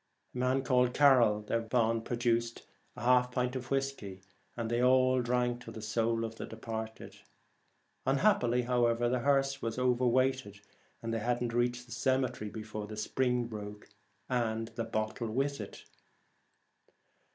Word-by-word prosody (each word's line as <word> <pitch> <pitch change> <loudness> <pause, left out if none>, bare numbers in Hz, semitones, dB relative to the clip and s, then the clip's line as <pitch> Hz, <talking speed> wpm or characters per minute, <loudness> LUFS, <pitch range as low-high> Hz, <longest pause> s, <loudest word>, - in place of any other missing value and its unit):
A - - -8
man 130 +1 +1
called 125 -1 +2
Carroll 125 -7 +5
thereupon 115 +1 0
produced 115 0 -1 0.3
a - - -8
half 125 0 +4
pint 125 0 -1
of 125 -1 -5
whiskey, 135 -9 -3 0.3
and 115 -1 -2
they 120 +1 0
all 130 0 +4
drank 120 0 0
to 115 - -9
the 110 - -8
soul 115 +1 0
of 115 0 -7
the - - -6
de - - -9
parted. 110 -1 -6 0.9
Unhappily, 135 - +3
however, 120 -1 +2
the 125 +1 +1
hearse 135 +1 +1
was 115 0 -3
over 125 0 +2
weighted, 130 -4 +1 0.4
and 115 0 -3
they 115 - 0
had 120 +2 0
not 120 -1 -2
reached 120 0 0
the 120 - -17
cemetery 125 -3 0
before 105 -1 -6
the 105 0 -8
spring 125 +2 0
broke, 105 -2 -8 0.4
and 115 -3 -1
the 115 0 -4
bottle 110 +1 -2
with 140 +5 -1
it. - - -10
120 Hz, 155 wpm, -31 LUFS, 115-125 Hz, 0.9 s, Carroll